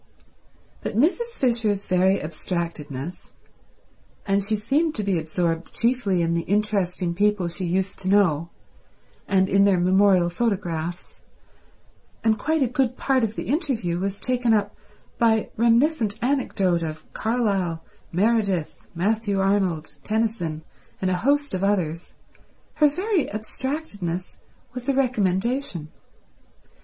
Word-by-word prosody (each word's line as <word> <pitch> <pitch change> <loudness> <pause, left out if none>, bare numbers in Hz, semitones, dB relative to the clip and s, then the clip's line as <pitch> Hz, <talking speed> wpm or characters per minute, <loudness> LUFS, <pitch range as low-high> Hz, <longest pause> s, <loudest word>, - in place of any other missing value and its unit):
But 210 - -4
Mrs. 465 - +1
Fisher's 225 -6 +1
very 190 +1 +3
abstractedness—and 165 +4 -5
she 215 +2 0
seemed 285 +10 0
to 215 - -2
be 195 -4 +1
absorbed 165 +1 -2
chiefly 230 -7 +1
in 165 0 +1
the 170 - +1
interesting 195 -3 0
people 205 -1 +1
she 175 +2 -4
used 185 +2 -1
to 185 - -2
know 170 -5 +3 0.8
and 190 -1 +3
in 195 +1 +4
their 195 -3 +4
memorial 185 -1 +4
photographs, 175 -5 -3 1.0
and 220 -1 +2
quite 315 -1 +1
a - - +2
good 255 0 0
part 265 -2 +1
of 220 0 -1
the - - -3
interview 250 - -1
was 195 +1 -3
taken 250 -3 +2
up 205 -1 -1 0.4
by 220 -2 +2
reminiscent 235 -1 +2
anecdote 225 -9 +1
of 155 -1 -5
Carlyle, 200 -8 -1 0.3
Meredith, 200 -3 0
Matthew 205 +2 0
Arnold, 190 -6 0
Tennyson, 215 -8 -1 0.4
and 185 -1 0
a 180 - +1
host 285 +7 +1
of 185 0 -1
others—her 195 - -2
very 370 +3 0
abstractedness 215 - -4 0.4
was 250 +2 -5
a 275 - +2
recommendation. 230 - 0
200 Hz, 120 wpm, -24 LUFS, 180-235 Hz, 1.0 s, in